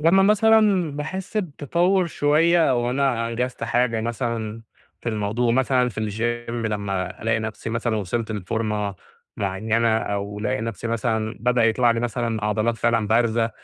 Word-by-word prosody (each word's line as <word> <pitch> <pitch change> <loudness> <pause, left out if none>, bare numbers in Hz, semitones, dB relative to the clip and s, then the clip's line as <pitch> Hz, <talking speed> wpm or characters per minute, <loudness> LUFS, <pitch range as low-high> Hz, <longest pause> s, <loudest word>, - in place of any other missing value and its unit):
لما 170 +5 +5
مثلًا 210 -4 +4
باحس 185 +8 -5
بتطور 175 +1 +1
شوية 160 +2 +3
أو 120 -1 +1
أنا 125 -3 0
أنجزت 125 0 -3
حاجة 120 -1 +1
مثلًا 115 -1 -3 0.4
في - - -4
الموضوع 110 +2 0
مثلًا 125 0 +2
في 110 -2 -6 0.5
الgym - - -3
لما 100 -5 -3
ألاقي 110 0 +1
نفسي 110 0 -5
مثلًا 115 0 -1
وصلت 110 +3 -2
لفورمة 105 0 -2 0.4
معينة، 110 +4 +1
أو 100 -1 -3
ألاقي 105 0 -1
نفسي 115 -1 -4
مثلًا 110 -1 -1
بدأ 125 0 +2
يطلع 120 +2 +3
لي 115 0 0
مثلًا 115 -2 -2
عضلات 110 +2 0
فعلًا 115 -2 +1
بارزة 115 0 +2
115 Hz, 145 wpm, -23 LUFS, 110-130 Hz, 0.5 s, لما